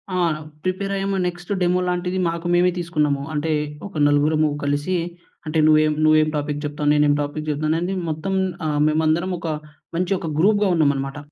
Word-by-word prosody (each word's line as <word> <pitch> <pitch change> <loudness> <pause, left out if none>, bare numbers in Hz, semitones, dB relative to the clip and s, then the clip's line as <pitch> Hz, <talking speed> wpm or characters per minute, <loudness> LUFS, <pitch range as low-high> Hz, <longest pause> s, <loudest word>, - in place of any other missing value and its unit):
ఆ! - - 0 0.5
ప్రిపేర్ 190 +2 -2
అయ్యాము. 195 0 -1
Next 175 +1 -7
demo 180 +1 +2
లాంటిది 180 +1 -1
మాకు 170 +1 -3
మేమే 180 +1 +4
తీసుకున్నాము. 150 -5 0
అంటే 155 +2 -1 0.4
ఒక 195 - -15
నలుగురము 150 +1 +3
కలిసి 145 +5 0 0.5
అంటే 155 +1 0
నువ్వేం, 155 0 +5
నువ్వేం 155 0 +4
టాపిక్ 145 0 -2
చెప్తావు, 145 0 -1
నేనేం 150 -1 +4
టాపిక్ 150 +1 -4
చెప్తానని 155 +5 -1 0.2
మొత్తం 155 +5 -3 0.3
ఆహ్, 150 -1 0
మేమందరం 160 +4 +1
ఒక 165 -1 -4 0.5
మంచి 180 +2 0
ఒక 165 - -4
గ్రూప్‌గా 205 +2 +3
ఉన్నామన్నమాట. 140 -3 0
155 Hz, 155 wpm, -22 LUFS, 150-180 Hz, 0.5 s, నువ్వేం